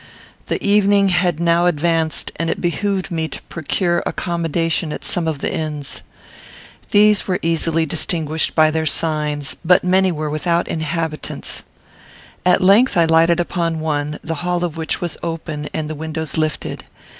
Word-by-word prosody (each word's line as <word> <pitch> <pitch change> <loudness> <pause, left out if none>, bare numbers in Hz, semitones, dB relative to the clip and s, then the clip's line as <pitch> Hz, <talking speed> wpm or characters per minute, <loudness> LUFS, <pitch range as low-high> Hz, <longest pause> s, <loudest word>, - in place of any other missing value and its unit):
The - - -1
evening 200 -1 +4
had 175 -3 +1
now 170 +1 +3
advanced, 165 -1 +1
and 165 0 -1
it - - -1
behooved 190 +3 -1
me 160 -1 -1
to 145 - -7
procure 175 +2 -1
accommodation 165 -1 -1
at - - -6
some 170 -2 -1
of 160 -2 -1
the - - -1
inns. 150 -3 -3 0.9
These 210 0 +4
were 185 -2 +1
easily 165 0 +1
distinguished 160 0 -1
by 155 -1 +5
their 160 0 -1
signs, 150 -3 -1
but 180 +2 +4
many 185 +1 +3
were 155 -2 -3
without 170 +3 0
inhabitants. 160 0 -3 0.9
At 180 - +4
length 200 +3 +5
I 170 - +5
lighted 165 +1 +4
upon 170 -2 -1
one, 150 -1 -2
the 165 -3 -4
hall 175 0 -1
of 170 -3 -2
which 160 -1 -2
was 175 -2 -3
open 160 -3 -4
and 155 -1 -3
the 155 - -4
windows 160 0 -3
lifted. 155 -1 -2
165 Hz, 155 wpm, -19 LUFS, 155-175 Hz, 0.9 s, by